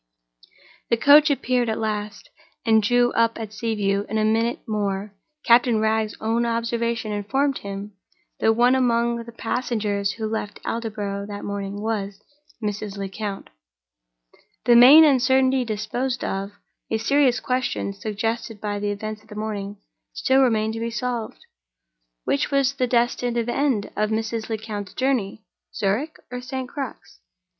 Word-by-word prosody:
The 235 - +3
coach 290 +5 +7
appeared 250 -4 +1
at 220 - -1
last, 210 -1 -4 0.3
and 220 -1 +5
drew 245 +2 +3
up 230 0 +2
at 220 -2 -6
Sea 225 0 -2
View. 200 -1 0
In 220 - -1
a 215 - +2
minute 230 +3 0
more, 205 -1 -2 0.3
Captain 235 -1 +4
Wragge's 220 0 0
own 225 +2 0
observation 230 -1 -1
informed 265 +7 0
him 200 +1 -7 0.5
that 225 - +4
one 245 +2 +4
among 235 -2 +1
the 235 - -11
passengers 215 -4 -1
who 220 - -5
left 215 -1 -4
Aldborough 205 -3 -3
that 205 -1 -7
morning 200 0 -4
was—Mrs. 210 0 -5
Lecount. 200 +1 -5 1.1
The 240 - +6
main 265 +7 +10
uncertainty 260 -2 +4
disposed 245 +3 -3
of, 195 +1 -2 0.4
a 225 - +1
serious 255 +2 +3
question—suggested 225 -2 -2
by 205 -1 -3
the 205 0 -1
events 215 +1 -5
of 220 - -24
the 210 - -11
morning—still 210 +5 -2
remained 220 -4 +2
to 225 - -5
be 230 0 -2
solved. 235 0 -4 0.8
Which 140 - 0
was 275 -1 +2
the 255 -2 0
destined 240 0 +1
end 240 -1 0
of 215 0 0
Mrs. 225 +1 -2
Lecount's 215 -3 -5
journey—Zurich 225 +1 -2
or 250 0 -5
St. 260 0 -5
Crux? 275 -1 -7
225 Hz, 135 wpm, -23 LUFS, 210-245 Hz, 1.1 s, main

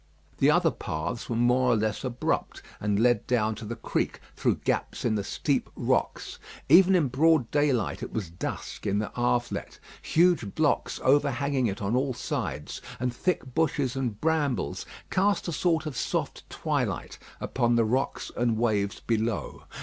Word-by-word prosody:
The - - +5
other - - +4
paths 80 +10 -4
were 120 - -1
more 125 +2 +3
or - - +3
less 110 -1 -1
abrupt, 125 -1 -2 0.2
and 105 -1 0
led 120 +1 +3
down 110 -3 +2
to 110 - -8
the 115 +2 -4
creek 115 - -2 0.2
through - - +1
gaps - - -1
in 115 - +2
the 105 -2 -1
steep - - -1
rocks. - - -1 0.3
Even 185 +5 +7
in 165 -6 +3
broad 140 0 +3
daylight, 145 -7 +1
it - - -5
was 100 -7 -4
dusk 85 - -5
in 100 0 +1
the 105 0 -2
Havelet. 120 0 -1 0.2
Huge 165 - +2
blocks 155 -2 +1
overhanging 140 -1 +2
it 100 0 -4
on 100 +4 0
all 130 0 0
sides, 75 -9 -4 0.2
and 125 -1 -1
thick 135 -2 -2
bushes 145 -5 +1
and 120 -6 -2
brambles 150 -6 0 0.2
cast 200 +1 +2
a - - -1
sort 160 -1 +1
of 150 -4 -4
soft - - -3
twilight - - -2 0.2
upon 120 -2 +1
the 115 -1 +3
rocks 130 +5 -1
and 120 -2 +1
waves 105 -4 0
below. 110 -7 -2
125 Hz, 165 wpm, -27 LUFS, 110-145 Hz, 0.3 s, Even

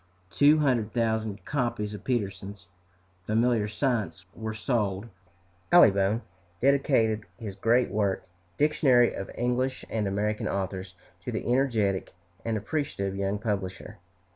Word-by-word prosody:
Two 145 +2 +5
hundred 125 -8 +1
thousand 110 -3 -1
copies 120 -7 -1
of 105 -1 -8
Peterson's 100 -5 -3 0.6
"Familiar 115 0 +2
Science" 110 - -1
were 110 0 -5
sold. 110 -2 -1 0.6
Allibone 105 - +5 0.4
dedicated 120 -5 +2
his 110 -5 -6
great 115 +5 +2
work, 100 -2 0 0.3
"Dictionary 135 -5 +4
of 100 - -6
English 125 +2 -1
and 110 -3 0
American 105 +2 -1
Authors," 95 -1 -3 0.3
to - - -4
the - - -3
energetic 115 -8 +1 0.3
and 115 -1 -1
appreciative 105 -5 -2
young 100 +1 -1
publisher. 95 -6 -4
110 Hz, 115 wpm, -27 LUFS, 100-125 Hz, 0.6 s, Two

